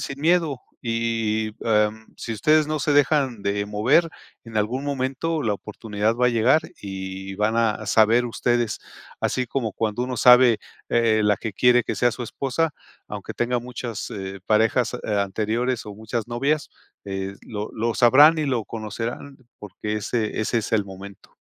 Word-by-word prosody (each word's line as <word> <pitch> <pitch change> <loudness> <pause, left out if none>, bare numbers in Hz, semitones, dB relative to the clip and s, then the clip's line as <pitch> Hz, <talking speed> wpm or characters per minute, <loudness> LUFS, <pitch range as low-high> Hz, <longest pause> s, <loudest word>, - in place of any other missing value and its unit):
sin 140 0 -5
miedo, 160 -5 +2 0.3
y, 115 -1 0
em, 110 0 +1
sí 115 - -5
ustedes 155 +8 +3
no 155 0 -1
se 145 +1 0
dejan 140 -6 +2
de 100 0 -1
mover, 125 +11 +2 0.3
en 110 -2 -3
algún 125 +7 -1
momento 140 +4 -2
la 105 -3 0
oportunidad 105 +1 -2
va 125 +1 +2
a - - +5
llegar 120 +6 +3 0.2
y 95 0 -6
van 110 +2 +1
a 110 -2 0
saber 115 +4 +4
ustedes. 120 -1 -1 0.4
Así 125 -1 -1
como 115 -4 -2
cuando 110 +1 -2
uno 125 -1 -3
sabe, 125 -2 +7 0.3
eh, 115 -2 +3
la 105 -1 +3
que 110 -3 -5
quiere 125 -1 +4
que - - -2
sea 120 0 +2
su 125 - -6
esposa, 140 +6 -1 0.4
aunque - - -6
tenga 120 +1 0
muchas, 120 -3 -6
eh, 95 -1 -6
parejas, 110 +3 +2
eh, 110 -3 -3
anteriores 110 +5 -1
o 105 - -7
muchas 110 +2 -4
novias, 140 +5 0 0.4
eh, 95 0 -4
lo 105 -2 -6
lo 115 0 -1
sabrán 145 +7 +7
y 155 - 0
lo 125 -5 0
conocerán 115 +6 -6 0.2
porque 105 +1 -5
ese 110 +1 -2
ese 115 +2 0
es 110 - -5
el 105 -3 +2
momento. 95 0 -12
115 Hz, 170 wpm, -23 LUFS, 105-125 Hz, 0.4 s, sabe